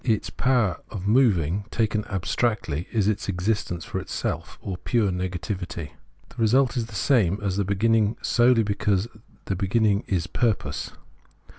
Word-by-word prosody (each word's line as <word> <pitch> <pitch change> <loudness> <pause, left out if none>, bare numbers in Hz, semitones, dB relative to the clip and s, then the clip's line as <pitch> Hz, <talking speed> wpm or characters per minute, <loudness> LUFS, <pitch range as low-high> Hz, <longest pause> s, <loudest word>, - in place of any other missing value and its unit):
Its 110 -4 0
power 120 -9 +1
of 100 -4 -6
moving, 100 - +3
taken 110 -2 0
abstractly, 95 - -1
is 105 -4 +1
its 105 -1 -1
existence 90 -2 -1
for - - -3
itself, - - -4
or 95 - -5
pure 110 -1 +1
negativity. 90 -3 -4 0.4
The - - -19
result 125 +3 +3
is 115 -3 -1
the 110 - -11
same 100 -2 +3
as 95 -2 0
the 100 - +2
begin 100 +4 +1
ning 110 0 +2
solely 120 -1 +4
because 100 0 0 0.4
the 100 - -1
beginning 100 +2 +2
is 90 -4 0
purpose. 110 +3 -1
105 Hz, 150 wpm, -25 LUFS, 95-115 Hz, 0.4 s, solely